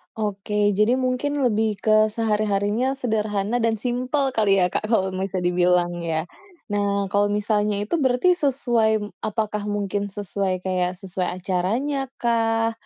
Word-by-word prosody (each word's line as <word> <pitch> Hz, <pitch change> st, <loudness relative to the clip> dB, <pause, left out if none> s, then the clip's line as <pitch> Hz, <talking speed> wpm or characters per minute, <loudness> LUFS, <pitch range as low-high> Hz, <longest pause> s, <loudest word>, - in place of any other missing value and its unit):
Oke, 210 Hz, -1 st, 0 dB
jadi 210 Hz, +5 st, +3 dB
mungkin 260 Hz, +2 st, -1 dB
lebih 220 Hz, -2 st, +1 dB
ke 215 Hz, 0 st, +5 dB
sehari-harinya 215 Hz, +3 st, 0 dB
sederhana 215 Hz, -3 st, -1 dB
dan 230 Hz, -1 st, +1 dB
simpel 255 Hz, +4 st, -1 dB
kali 210 Hz, -5 st, +3 dB
ya 180 Hz, 0 st, +2 dB
Kak, 215 Hz, -, -2 dB
kalau 190 Hz, -4 st, +1 dB
bisa 185 Hz, -1 st, -3 dB
dibilang 175 Hz, 0 st, +2 dB
ya. 160 Hz, -2 st, -1 dB, 0.5 s
Nah 200 Hz, -1 st, 0 dB
kalau 205 Hz, 0 st, +3 dB
misalnya 210 Hz, 0 st, +1 dB
itu 210 Hz, -, -2 dB
berarti 260 Hz, +6 st, +3 dB
sesuai 240 Hz, -8 st, +1 dB, 0.2 s
apakah 215 Hz, -1 st, -2 dB
mungkin 205 Hz, 0 st, -2 dB
sesuai 195 Hz, -2 st, -2 dB
kayak 180 Hz, -1 st, -1 dB
sesuai 185 Hz, -2 st, -3 dB
acaranya 230 Hz, +10 st, -1 dB
kah, 225 Hz, -1 st, +1 dB
210 Hz, 135 wpm, -23 LUFS, 195-235 Hz, 0.5 s, ke